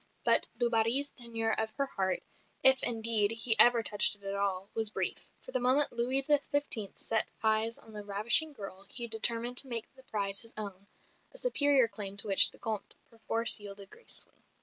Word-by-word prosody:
But -, -, +3 dB
du 240 Hz, 0 st, +1 dB
Barry's 235 Hz, +5 st, +1 dB
tenure 230 Hz, -2 st, -5 dB
of 220 Hz, 0 st, -2 dB
her 280 Hz, -, -3 dB
heart, 190 Hz, -7 st, -4 dB, 0.4 s
if 265 Hz, 0 st, +7 dB
indeed 225 Hz, -3 st, +1 dB
he 225 Hz, 0 st, +5 dB
ever 235 Hz, 0 st, +5 dB
touched 210 Hz, -1 st, +4 dB
it 205 Hz, -, -28 dB
at 195 Hz, 0 st, -6 dB
all, 200 Hz, -1 st, -4 dB
was 225 Hz, -1 st, -1 dB
brief; -, -, -6 dB, 0.2 s
for -, -, -11 dB
the -, -, -1 dB
moment 260 Hz, +4 st, +1 dB
Louis 250 Hz, +3 st, 0 dB
XV. 285 Hz, -7 st, -2 dB
set 225 Hz, -1 st, -2 dB
eyes 220 Hz, +1 st, -1 dB
on 220 Hz, -, -18 dB
the 210 Hz, -1 st, -9 dB
ravishing 215 Hz, +10 st, 0 dB
girl 195 Hz, -6 st, -12 dB
he 240 Hz, -, -1 dB
determined 230 Hz, +2 st, +1 dB
to 270 Hz, -, +2 dB
make 235 Hz, -1 st, -4 dB
the 265 Hz, -, -20 dB
prize 200 Hz, -5 st, -4 dB
his 230 Hz, 0 st, -6 dB
own, 200 Hz, -2 st, -7 dB, 0.4 s
a -, -, -14 dB
superior 285 Hz, -, +3 dB
claim 200 Hz, -3 st, -5 dB
to 200 Hz, -, +3 dB
which 195 Hz, -1 st, +8 dB
the -, -, -20 dB
Comte 220 Hz, -2 st, -7 dB, 0.2 s
perforce 230 Hz, 0 st, -1 dB
yielded 200 Hz, -1 st, -12 dB
gracefully. 470 Hz, -, -11 dB
225 Hz, 190 wpm, -29 LUFS, 205-250 Hz, 0.4 s, which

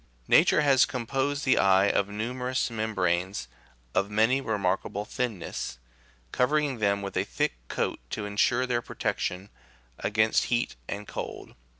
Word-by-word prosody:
Nature -, -, +5 dB
has 135 Hz, -4 st, +5 dB
composed 135 Hz, +4 st, -2 dB
the 130 Hz, -, +4 dB
eye 95 Hz, 0 st, +5 dB
of 100 Hz, -1 st, +2 dB
numerous 125 Hz, +4 st, -2 dB
mem 110 Hz, -1 st, -3 dB
branes 90 Hz, -3 st, 0 dB, 0.5 s
of 100 Hz, -, +1 dB
'remarkable 105 Hz, -3 st, +1 dB
thinness, 100 Hz, -, -4 dB, 0.5 s
covering 140 Hz, 0 st, +1 dB
them 100 Hz, -1 st, +1 dB
with 100 Hz, -, -5 dB
a -, -, +2 dB
thick -, -, -1 dB
coat -, -, -2 dB
to 105 Hz, -, -4 dB
ensure 110 Hz, +5 st, +2 dB
their 120 Hz, -2 st, 0 dB
protection 95 Hz, -3 st, -3 dB, 0.5 s
against 110 Hz, +1 st, +2 dB
heat 120 Hz, +1 st, 0 dB
and 105 Hz, +1 st, -5 dB
cold. -, -, -6 dB
110 Hz, 130 wpm, -27 LUFS, 100-125 Hz, 0.5 s, Nature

